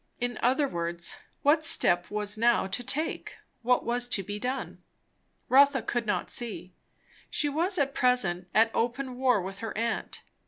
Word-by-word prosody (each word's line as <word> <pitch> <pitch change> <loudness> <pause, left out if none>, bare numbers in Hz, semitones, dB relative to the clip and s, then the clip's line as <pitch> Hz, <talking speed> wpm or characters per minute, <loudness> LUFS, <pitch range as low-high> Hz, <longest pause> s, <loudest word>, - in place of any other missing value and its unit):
In 245 -2 -3
other 265 +4 +2
words, 170 -4 -3 0.3
what 300 +2 +4
step 175 - +3
was 210 0 -1
now 235 0 +2
to 200 +6 -3
take? 305 +6 -3 0.2
What 250 +1 +1
was 240 +1 +1
to 210 -5 0
be 205 +2 -6
done? 255 +4 -4 0.7
Rotha 275 -1 +5
could 240 -2 -2
not 185 -4 -1
see. 215 -6 -4 0.6
She 295 - -1
was 345 +7 +1
at 275 -2 0
present 190 -10 +1
at 225 +2 +4
open 250 +2 -2
war 250 -6 +2
with 195 +1 -7
her 225 -2 -6
aunt. 230 0 -3
240 Hz, 160 wpm, -28 LUFS, 205-265 Hz, 0.7 s, Rotha